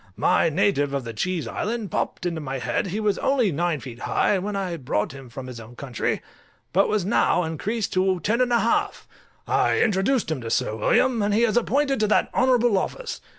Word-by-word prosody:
My 165 Hz, -, +3 dB
native 155 Hz, -5 st, +1 dB
of 135 Hz, -, -2 dB
the 115 Hz, -1 st, -6 dB
Cheese 165 Hz, -, -2 dB
Island 215 Hz, -, -3 dB
popped -, -, -2 dB
into 165 Hz, -2 st, -2 dB
my 135 Hz, -2 st, -4 dB
head; 125 Hz, -, -1 dB
he 195 Hz, +4 st, -3 dB
was 210 Hz, -2 st, 0 dB
only 255 Hz, -7 st, +2 dB
nine 165 Hz, 0 st, 0 dB
feet 120 Hz, -2 st, -9 dB
high 195 Hz, -, +1 dB
when 200 Hz, +2 st, -4 dB
I 195 Hz, -2 st, -2 dB
first 165 Hz, -5 st, -6 dB
brought 105 Hz, -, 0 dB
him 135 Hz, -2 st, -11 dB
from 130 Hz, +2 st, -8 dB
his 125 Hz, -2 st, -8 dB
own 115 Hz, +2 st, -12 dB
country, 125 Hz, -3 st, -3 dB, 0.5 s
but 195 Hz, +3 st, +3 dB
was 210 Hz, -4 st, 0 dB
now 195 Hz, -3 st, +2 dB
increased 195 Hz, +7 st, -3 dB
to 185 Hz, 0 st, +2 dB
ten 225 Hz, +8 st, 0 dB
and 250 Hz, -1 st, +1 dB
a 235 Hz, -, +3 dB
half: 230 Hz, -, 0 dB, 0.4 s
I -, -, +2 dB
introduced 210 Hz, 0 st, +1 dB
him 145 Hz, -5 st, -2 dB
to 115 Hz, -, -5 dB
Sir 110 Hz, -, 0 dB
William, 235 Hz, -, +2 dB
and 205 Hz, 0 st, +1 dB
he 230 Hz, -, +3 dB
is 230 Hz, -2 st, +2 dB
appointed 270 Hz, +3 st, +1 dB
to 215 Hz, -, +2 dB
that 215 Hz, -, +2 dB
honourable 245 Hz, -5 st, +3 dB
office. -, -, -5 dB
190 Hz, 215 wpm, -24 LUFS, 140-220 Hz, 0.5 s, My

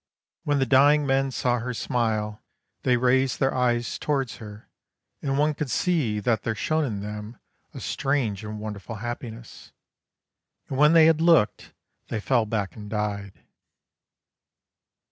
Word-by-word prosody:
When 145 Hz, -1 st, +2 dB
the 135 Hz, -, +2 dB
dying 145 Hz, +3 st, +5 dB
men 135 Hz, 0 st, +1 dB
saw 125 Hz, -1 st, 0 dB
her 125 Hz, +1 st, -4 dB
smile 110 Hz, -3 st, -1 dB, 0.4 s
they 125 Hz, -1 st, +2 dB
raised 130 Hz, +1 st, +2 dB
their 135 Hz, 0 st, +2 dB
eyes 120 Hz, -2 st, 0 dB
towards 135 Hz, -5 st, -1 dB
her, 105 Hz, -1 st, -11 dB, 0.5 s
and 135 Hz, -1 st, -1 dB
one 150 Hz, +1 st, +2 dB
could 150 Hz, -1 st, -4 dB
see 135 Hz, -11 st, 0 dB
that 110 Hz, 0 st, +1 dB
there 110 Hz, -, -2 dB
shone 155 Hz, +10 st, 0 dB
in 105 Hz, -6 st, -4 dB
them 105 Hz, +2 st, -7 dB, 0.4 s
a -, -, -6 dB
strange 130 Hz, -8 st, -1 dB
and 105 Hz, 0 st, -6 dB
wonderful 105 Hz, +1 st, -6 dB
happiness. 120 Hz, +1 st, -8 dB, 1.0 s
And 135 Hz, -, -3 dB
when 150 Hz, +2 st, +6 dB
they 165 Hz, -1 st, +7 dB
had 160 Hz, 0 st, +4 dB
looked 165 Hz, -11 st, +3 dB, 0.3 s
they 110 Hz, -, -3 dB
fell 115 Hz, 0 st, +1 dB
back 105 Hz, -3 st, -2 dB
and 105 Hz, -1 st, -9 dB
died. 105 Hz, -2 st, -4 dB
120 Hz, 145 wpm, -25 LUFS, 105-135 Hz, 1.0 s, they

